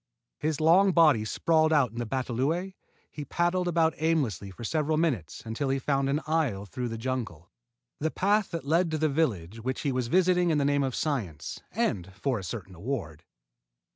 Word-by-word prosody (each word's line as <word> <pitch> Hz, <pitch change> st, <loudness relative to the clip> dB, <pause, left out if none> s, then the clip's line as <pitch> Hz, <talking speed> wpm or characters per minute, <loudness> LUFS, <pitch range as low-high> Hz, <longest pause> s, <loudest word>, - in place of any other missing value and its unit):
His 155 Hz, -1 st, -1 dB
long 180 Hz, +5 st, +5 dB
body 150 Hz, -10 st, +5 dB
sprawled 160 Hz, +7 st, +2 dB
out 140 Hz, -7 st, +3 dB
in 115 Hz, -, -7 dB
the 120 Hz, -, -3 dB
batalõe, 135 Hz, -, -1 dB, 0.4 s
he 150 Hz, -, -6 dB
paddled 175 Hz, +5 st, 0 dB
about 165 Hz, -2 st, +2 dB
aimlessly 145 Hz, -, 0 dB
for 95 Hz, +5 st, -10 dB
several 155 Hz, +4 st, 0 dB
minutes 140 Hz, -, -1 dB
until 115 Hz, +5 st, -2 dB
he 135 Hz, -, +1 dB
found 135 Hz, 0 st, 0 dB
an 145 Hz, +3 st, 0 dB
aisle 150 Hz, -11 st, 0 dB
through 125 Hz, +5 st, -4 dB
the 115 Hz, -, -4 dB
jungle 115 Hz, -, -4 dB, 0.5 s
the 160 Hz, -, 0 dB
path 205 Hz, +4 st, +1 dB
that 165 Hz, -4 st, -5 dB
led 165 Hz, +4 st, +2 dB
to 155 Hz, -, -1 dB
the 155 Hz, -, 0 dB
jungle 140 Hz, -, -3 dB
village 95 Hz, 0 st, -8 dB
which 130 Hz, +3 st, -3 dB
he 145 Hz, -, 0 dB
was 125 Hz, -2 st, -1 dB
visiting 180 Hz, +3 st, +3 dB
in 155 Hz, -, +2 dB
the 140 Hz, -, +1 dB
name 145 Hz, 0 st, +2 dB
of 130 Hz, -2 st, -1 dB
science, 100 Hz, -, -3 dB
and 90 Hz, -1 st, -1 dB
for 125 Hz, +3 st, -1 dB
a -, -, -8 dB
certain 95 Hz, +1 st, -6 dB
award. 90 Hz, -, -5 dB
140 Hz, 195 wpm, -28 LUFS, 115-160 Hz, 0.5 s, long